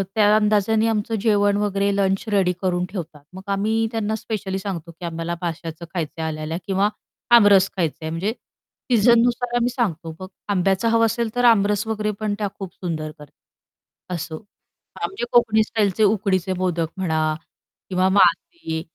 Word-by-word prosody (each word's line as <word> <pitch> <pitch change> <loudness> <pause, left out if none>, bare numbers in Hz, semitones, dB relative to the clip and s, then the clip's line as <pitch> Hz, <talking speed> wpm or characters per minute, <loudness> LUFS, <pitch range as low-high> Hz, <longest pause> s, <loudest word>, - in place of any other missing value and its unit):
त्या 210 -1 +5
अंदाजाने 215 +1 +2
आमचं 225 0 -1
जेवण 205 -2 +3
वगैरे 200 -1 0
लंच 195 -1 +1
रेडी 195 -3 +3
करून 180 -2 0
ठेवतात. 160 -7 -7
मग 190 - -8
आम्ही 220 +3 +1
त्यांना 220 -2 -1
स्पेशली 200 -3 -4
सांगतो 180 -4 -5
की 170 +1 -10
"आम्हाला 165 +1 -3
माश्याचं 165 -1 -5
खायचं 165 -2 -4
आहे 160 - -1
आल्या-आल्या 155 +1 -4
किंवा 195 +1 +2 0.5
आमरस 200 -3 +5
खायचं 165 -4 -1
आहे." - - -2
म्हणजे 185 +7 -2 0.6
सीझननुसार 240 +1 +3
आम्ही 240 0 +2
सांगतो. 170 - -3
मग 185 - -7 0.2
आंब्याचं 195 +2 +1
हवं 230 0 +4
असेल 230 0 -1
तर 245 0 +2
आमरस 210 -2 +4
वगैरे 215 -1 -1
पण 215 -1 -1
त्या 210 - 0
खूप 190 -3 -7
सुंदर 155 -4 -4
कर 150 - -10 0.9
असो, 160 +1 -6 0.6
आमचे 390 -10 -3
कोकणी 220 -2 +4
स्टाईलचे 215 -2 0
उकडीचे 195 -3 +1
मोदक 175 -3 -1
म्हणा 160 -4 0 0.5
किंवा 185 0 +2
मासे. 185 - +2
195 Hz, 155 wpm, -22 LUFS, 175-220 Hz, 0.9 s, त्या